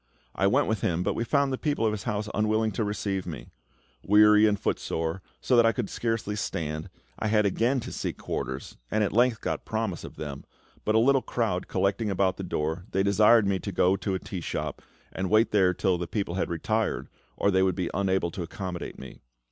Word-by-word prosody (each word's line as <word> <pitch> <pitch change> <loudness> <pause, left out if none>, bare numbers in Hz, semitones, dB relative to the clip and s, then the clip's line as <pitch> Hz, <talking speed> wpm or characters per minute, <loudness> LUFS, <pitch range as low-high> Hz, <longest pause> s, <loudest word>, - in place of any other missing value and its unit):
I 100 - +2
went 100 - +3
with 110 -3 -1
him, 85 0 0
but 95 - 0
we 115 - -1
found 140 +2 +1
the 130 - -3
people 145 -6 0
of 110 - +3
his 105 -3 -5
house 105 -1 -2
unwilling 110 +1 +1
to 110 - -1
receive 100 -2 -2
me. 70 -8 -7 0.5
Weary 105 +1 +6
and 105 -1 +1
footsore, 80 +2 -2 0.2
so 130 - +2
that 120 -1 +6
I - - +5
could 120 -6 -3
scarcely 115 -3 -2
stand, 80 -4 -3 0.3
I 110 - -1
had 105 -1 +3
again 115 +7 +1
to - - -7
seek - - -4
quarters, 65 +2 -5
and 110 - +1
at 100 - -1
length 120 0 +3
got - - -2
promise 110 -6 -3
of - - -9
them; 70 -2 -6 0.4
but 110 - +2
a - - +6
little 135 +4 +4
crowd 110 -9 -1
collecting 100 +3 0
about 95 -1 +1
the 95 - -5
door, 80 0 -2
they 95 - +1
desired 105 +2 +5
me 100 -1 +1
to 100 - -5
go 90 +1 +3
to 100 -1 -2
a - - -2
tea 90 -1 -6
shop - - -4 0.3
and 95 0 -3
wait 110 +2 +4
there 95 -3 +4
till 90 -1 0
the 90 - -3
people 100 -1 -2
had 95 +1 -1
retired, 110 +6 -1 0.3
or 100 - +2
they 95 0 +3
would 95 -1 +2
be 90 -3 -2
unable 95 -3 0
to 95 - -5
accommodate 90 +1 -5
me. 65 - -11
100 Hz, 220 wpm, -27 LUFS, 90-110 Hz, 0.5 s, Weary